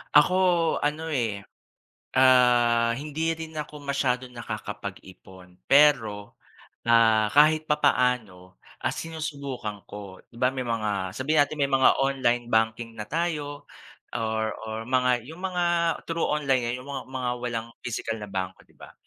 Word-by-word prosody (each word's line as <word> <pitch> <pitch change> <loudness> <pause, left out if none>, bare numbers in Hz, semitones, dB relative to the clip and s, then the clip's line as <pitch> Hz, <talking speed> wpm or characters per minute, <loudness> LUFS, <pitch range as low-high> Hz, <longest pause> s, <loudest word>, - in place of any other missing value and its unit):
Ako 150 +5 +6 0.4
ano 155 +2 -2
eh, 115 -8 -1 0.7
ah, 120 -2 +5
hindi 155 +3 -2
rin 160 0 -8
ako 150 -1 -7
masyadong 130 -3 -1
nakakapag-ipon. 95 -5 -8
Pero, 125 -8 +3 0.5
ah, 110 -2 +5
kahit 155 +2 +5
papaano, 115 -11 +1 0.3
ah, - - 0
sinusubukan 140 -9 -5
ko. 100 -2 -9
Di 115 - -19
ba 125 - +3
may 130 -2 -4
mga 105 -5 -2
sabihin 150 +3 +2
natin 155 - -8
may 140 - +1
mga 135 -1 +5
online 130 -3 +1
banking 110 +1 +1
na 105 -1 -6
tayo 150 -2 -3 0.5
or 110 -1 -1
or 110 0 -4
mga 125 -1 +2
yung 165 +2 -11
mga 180 -2 -1 0.4
through 165 0 0
online 140 -4 +1
lang 120 +1 -2
yung 140 - -13
mga 135 -2 -5
mga 130 -2 -3
walang 115 -2 -3 0.2
physical 115 -1 -3
na 105 - -7
bank, 95 -1 -3
di - - -27
ba? - - -13
125 Hz, 140 wpm, -26 LUFS, 110-145 Hz, 0.7 s, Ako